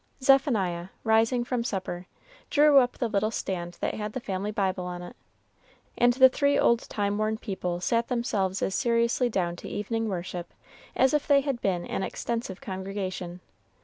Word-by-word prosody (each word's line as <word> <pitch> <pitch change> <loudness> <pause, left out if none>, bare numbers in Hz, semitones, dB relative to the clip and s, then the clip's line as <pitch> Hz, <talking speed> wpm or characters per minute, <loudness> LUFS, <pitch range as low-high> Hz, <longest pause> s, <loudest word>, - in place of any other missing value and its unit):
Zephaniah, 215 - +3 0.2
rising 225 +2 +3
from 245 -1 -2
supper, 185 -5 -4 0.4
drew 295 -2 +6
up 250 -1 +1
the 240 - -2
little 215 0 +1
stand 175 -5 -4
that - - 0
had 210 0 -4
the - - -3
family 195 -3 -3
Bible 190 -3 -1
on 180 0 -5
it, 175 - -10 0.8
and 245 0 +4
the 260 +1 +8
three 280 +2 +2
old 235 -3 +2
time 205 0 -1
worn 215 0 0
people 185 -6 -3
sat 230 +5 +1
themselves 205 -6 -1
as 190 - 0
seriously 235 +1 +2
down 175 -5 -1
to - - -8
evening 225 +2 -2
worship 175 -2 -5 0.4
as 265 +2 +3
if 300 -1 +1
they 285 -2 +5
had 270 -4 -3
been 180 -3 0
an - - -3
extensive 230 -2 -3
congregation. 185 -2 -5
210 Hz, 170 wpm, -27 LUFS, 185-240 Hz, 0.8 s, the